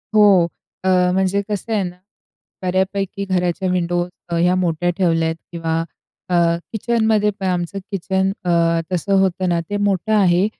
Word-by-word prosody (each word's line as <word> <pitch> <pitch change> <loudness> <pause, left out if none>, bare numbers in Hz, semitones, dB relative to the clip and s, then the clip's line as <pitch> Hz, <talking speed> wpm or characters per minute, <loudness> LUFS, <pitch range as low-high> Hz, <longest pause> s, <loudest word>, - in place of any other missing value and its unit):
हो, 200 -5 +6 0.4
अ, 190 - +1 0.2
म्हणजे 190 +1 +1
कसं 210 +2 -3
आहे 205 -3 +1
ना, 180 0 -5 0.7
बऱ्यापैकी 190 +2 -1
घराच्या 185 0 0
विंडो 175 -1 0 0.3
ह्या 175 +2 +3
मोठ्या 175 -1 0
ठेवल्यात 165 -3 +2 0.2
किंवा 165 -1 -1 0.5
अ, 180 - -1 0.4
किचनमध्येपण 215 -3 +1
आमचं 180 +1 -1
किचन 190 0 0
अ, 180 - 0 0.4
तसं 180 +3 -1
होतं 185 -1 +1
ना 170 -1 +1
ते 205 - -1
मोठं 205 +1 0
आहे. 190 -2 +4
185 Hz, 135 wpm, -20 LUFS, 175-200 Hz, 0.7 s, हो